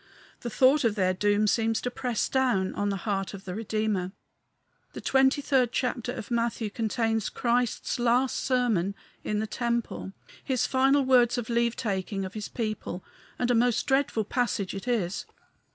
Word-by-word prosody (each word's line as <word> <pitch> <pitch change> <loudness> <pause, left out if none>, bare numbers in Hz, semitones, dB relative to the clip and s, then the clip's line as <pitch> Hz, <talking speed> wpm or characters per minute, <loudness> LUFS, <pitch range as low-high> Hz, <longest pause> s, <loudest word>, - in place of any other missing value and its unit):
The 240 - -5
thought 265 +5 +4
of 225 -3 +2
their 185 -3 +2
doom 205 +2 +2
seems 225 +1 +1
to 245 - -2
press 245 -3 -1
down 245 -8 +1 0.2
the 200 - -1
heart 195 0 -2
of 195 - -11
the 180 - -5
Redeemer. 215 -3 -1 0.8
The - - -7
twenty 265 +1 +3
third 255 -4 +2
chapter 245 -1 -1
of 245 -2 -7
Matthew 230 -2 -1
contains 225 -1 -1
Christ's 245 0 0
last 245 +2 +2
sermon 225 -7 +1 0.3
in 210 - -1
the 215 - 0
temple 235 -4 -3 0.3
his 260 -3 0
final 270 +1 +3
words 250 -2 +4
of 240 -1 -3
leave 235 0 +1
taking 195 -2 -2
of 185 - -7
his 215 -1 -5
people; 215 -5 -4 0.3
and 245 0 +1
a - - +4
most 240 0 +2
dreadful 265 -5 +1
passage 220 -5 -1
it 195 +4 -7
is. 200 -7 -1
230 Hz, 165 wpm, -27 LUFS, 205-245 Hz, 0.8 s, thought